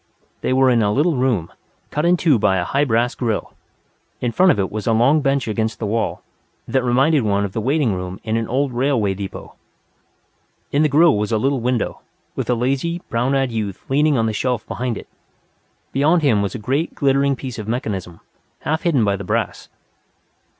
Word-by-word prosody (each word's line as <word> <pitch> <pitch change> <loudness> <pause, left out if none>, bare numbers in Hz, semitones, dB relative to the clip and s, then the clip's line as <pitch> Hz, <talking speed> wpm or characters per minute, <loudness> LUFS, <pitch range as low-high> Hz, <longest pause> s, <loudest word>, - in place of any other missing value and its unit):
They - - -1
were 130 0 +4
in 120 -2 +3
a 105 -1 +2
little 150 +7 +2
room, 125 -10 0 0.4
cut 150 +2 -1
in 180 +1 +4
two 155 -9 +3
by 95 -2 +2
a 90 - 0
high 140 +10 +1
brass 120 +1 +1
grill. 115 -4 -2 0.7
In 120 - -1
front 185 +7 +4
of - - 0
it 95 -2 -1
was 105 0 -5
a 115 - +3
long 135 +7 +4
bench 135 -2 0
against 110 +1 -1
the 110 - -4
wall, 110 +2 -2 0.4
that 130 -2 +1
reminded 135 +5 +3
one 100 -2 +1
of 100 - -5
the 110 - -2
waiting 135 -1 +1
room 90 0 -5
in 110 0 -1
an 115 -1 -1
old 135 +1 0
railroad 120 -7 +1
depot. 100 -1 -7 1.2
In 145 - +2
the 155 - +3
grill 155 +3 +5
was 105 +2 -1
a 110 - +2
little 135 +4 +1
window, 120 -2 -1 0.3
with - - -3
a 125 - +3
lazy, 140 +8 -1
brown 125 +4 0
eyed 135 -2 +1
youth 105 -4 -4
leaning 145 +1 +3
on 115 - +2
the 110 - -1
shelf 125 +1 -1
behind 125 -3 -3
it. - - -10 0.8
Beyond 155 +4 +2
him 115 -8 +3
was 100 +3 -2
a - - -2
great, 135 +9 -2
glittering 140 0 +2
piece 130 -3 -7
of 105 - -6
mechanism, 100 -7 -4 0.4
half 160 +1 -1
hidden 145 -10 +2
by 100 -1 +1
the 100 - -6
brass. 90 - -2
125 Hz, 205 wpm, -20 LUFS, 110-140 Hz, 1.2 s, grill